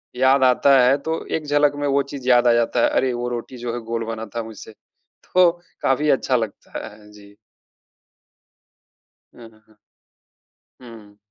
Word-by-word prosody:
याद 130 +2 +3
आता 130 +2 +4
है 135 +2 +4
तो 160 0 -3
एक 155 - -9
झलक 145 0 +2
में 145 0 -2
वो 140 0 +2
चीज 135 -3 -7
याद 120 -1 +4
आ 120 - +5
जाता 120 +1 +1
है। - - +4
अरे! 130 -1 0
वो 120 0 -3
रोटी 120 +1 -6
जो 120 -1 -5
है 120 - -4
गोल 115 -1 -2
बना 110 0 -5
था 115 - -2
मुझसे 110 0 -11 0.6
तो 180 -1 +5 0.3
काफ़ी 145 +3 +1
अच्छा 135 -1 +1
लगता 110 -4 -6
है। 105 0 -16
जी। 100 -1 -17 2.0
अ, - - -17
हाँ, 110 0 -25
हाँ। 110 - -25 1.0
हुँ। 110 -4 -14
120 Hz, 170 wpm, -21 LUFS, 115-135 Hz, 2.0 s, आ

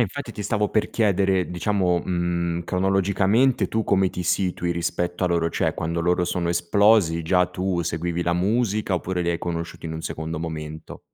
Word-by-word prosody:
infatti 120 +2 -2
ti 105 - -6
stavo 105 0 0
per 110 - +1
chiedere, 95 -4 +1
diciamo, 90 -1 +1
mhmm, 85 -1 -1
cronologicamente 95 +7 +2
tu 110 -1 -1
come 95 -1 +3
ti 90 - -5
situi 90 0 0
rispetto 85 +1 -2
a - - +2
loro, 85 -1 +1
cioè, - - 0
quando 85 +1 -2
loro 90 +1 +2
sono 85 0 -1
esplosi 85 0 +3
già 90 +2 +3
tu 90 -1 -2
seguivi 85 +1 -2
la 85 - 0
musica, 105 +2 0
oppure 90 +1 -2
li 85 - -1
hai 85 - -1
conosciuti 85 -1 -5
in 80 - -5
un 80 - -5
secondo 80 0 -4
momento? 80 -1 -6
90 Hz, 180 wpm, -23 LUFS, 85-95 Hz, -, come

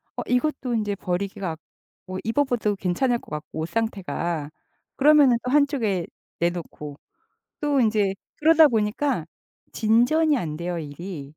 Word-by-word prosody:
어 - - -3
이것도 250 -1 0
인제 210 -2 -1
버리기가 185 0 -3
아 - - -5 0.5
어 185 0 -5
입어봐도 230 -3 +1
괜찮을 220 +7 0
것 - - -17
같고, 150 +1 -6
옷 160 - -1
상태가. 175 -8 -2 0.5
그러면은 285 -4 +6
또 250 - -4
한쪽에 265 - +2 0.3
내놓고 170 -4 -3 0.6
또 290 -2 +2
인제 210 -4 +2 0.2
그러다 320 0 +6
보니까 220 - 0 0.5
진전이 245 +8 +3
안 155 - -3
돼요, 170 +1 -3
일이. 155 +1 -7
215 Hz, 285 characters per minute, -24 LUFS, 175-265 Hz, 0.6 s, 그러면은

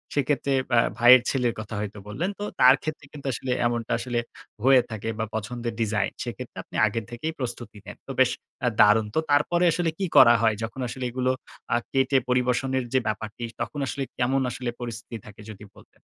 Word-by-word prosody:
সেক্ষেত্রে 140 -1 0 0.3
আ - - +7 0.2
ভাইয়ের 120 +1 +8
ছেলের 125 -3 0
কথা 110 0 -6
হয়তো 105 0 -5
বললেন। 150 - -2
তো - - -3 0.2
তার 130 +1 +8
ক্ষেত্রে 155 -2 -5
কিন্তু 140 -2 -8
আসলে 125 +3 -4 0.2
এমনটা 120 0 -3
আসলে 120 0 -2 0.4
হয়ে 130 0 +6
থাকে 110 0 -5
বা 110 - 0
পছন্দের 115 +2 -4
design 105 -3 0
সেক্ষেত্রে - - -7
আপনি - - -15
আগের 110 +1 -2
থেকেই 140 +7 -4
প্রস্তুতি 120 -3 -5
নেন। - - -9
তো - - -5
বেশ 130 -1 +5 0.5
দারুণ 105 +1 +5
তো। - - +4
তারপরে 160 +5 +3
আসলে 170 0 0
কি 195 - -1
করা 120 - +9
হয়? 110 -1 +3
যখন 115 +4 -6
আসলে 130 +2 -6
এগুলো 130 +1 0 0.4
আ - - +4
কেটে 135 0 +2
পরিবেশনের 125 +1 +1
যে 130 - +4
ব্যাপারটি 110 +2 -4 0.2
তখন 120 +5 -4
আসলে 135 +3 -3
কেমন 130 +2 +1
আসলে 125 0 -4
পরিস্থিতি 115 0 -6
থাকে 105 0 -13
যদি 105 0 -11
বলতেন? - - -20
120 Hz, 185 wpm, -25 LUFS, 110-135 Hz, 0.5 s, করা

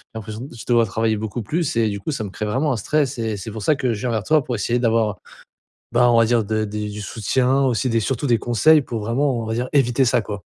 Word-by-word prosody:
l'impression 110 0 -6
d 135 - -7
je 115 - -10
dois 120 -2 +3
travailler 110 +1 0
beaucoup 110 +2 -4
plus. 155 - -2
Et 115 -1 +2
du 100 -1 -4
coup, 130 - -4
ça 130 -6 -3
me 100 - -5
crée 105 - -5
vraiment 130 +8 0
un - - -2
stress 140 +4 0
et 110 -2 -2
c'est 100 +3 -7
pour 110 +1 -7
ça 150 - +3
que 130 -3 -1
je 105 - -5
viens 125 - -1
vers 110 -3 -1
toi 155 +4 +3
pour 125 - -3
essayer 120 +3 0
d'avoir, 115 -4 +1 0.8
ben, 120 - +4
on 120 -1 +4
va 115 - +6
dire 115 -1 +2
de 110 +1 -1
des 105 0 -4
du 105 0 -7
soutien 125 +6 0
aussi 125 -1 +1
des, 115 0 +2
surtout 130 +5 -2
des 120 -3 +3
conseils 145 +8 +4
pour 115 -4 -5
vraiment, 120 +4 0
on - - -4
va 110 - -2
dire 120 +2 -2
éviter 135 -2 +3
ça, 120 - +2
quoi. 105 -2 -6
115 Hz, 280 wpm, -21 LUFS, 110-130 Hz, 0.8 s, va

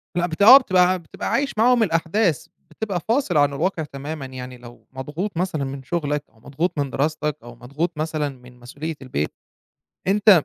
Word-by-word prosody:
لأ، 175 - +2
بت 160 +3 -6
آه، 245 +7 +11
بتبقى 185 -6 +3
بتبقى 160 - -6
عايش 280 0 0
معاهم 240 +1 +5
الأحداث، 165 - +1 0.2
بتبقى 195 +1 -3
فاصل 230 - +2
عن 145 -1 +4
الواقع 165 +2 -1
تمامًا، 145 0 -6
يعني 125 -1 -8
لو 120 0 -14
مضغوط 150 +9 -5
مثلًا 175 -5 -1
من 135 0 -5
شغلك، 150 -1 -2
أو 110 - -27
مضغوط 150 +5 -2
من 140 -1 0
دراستك، 150 +1 -1
أو 120 0 -11
مضغوط 150 +8 -4
مثلًا 155 -1 -1
من 125 -2 -15
مسؤولية 145 +6 -6
البيت، 75 - -3 0.7
أنت 200 -4 +5
155 Hz, 170 wpm, -22 LUFS, 135-180 Hz, 0.7 s, آه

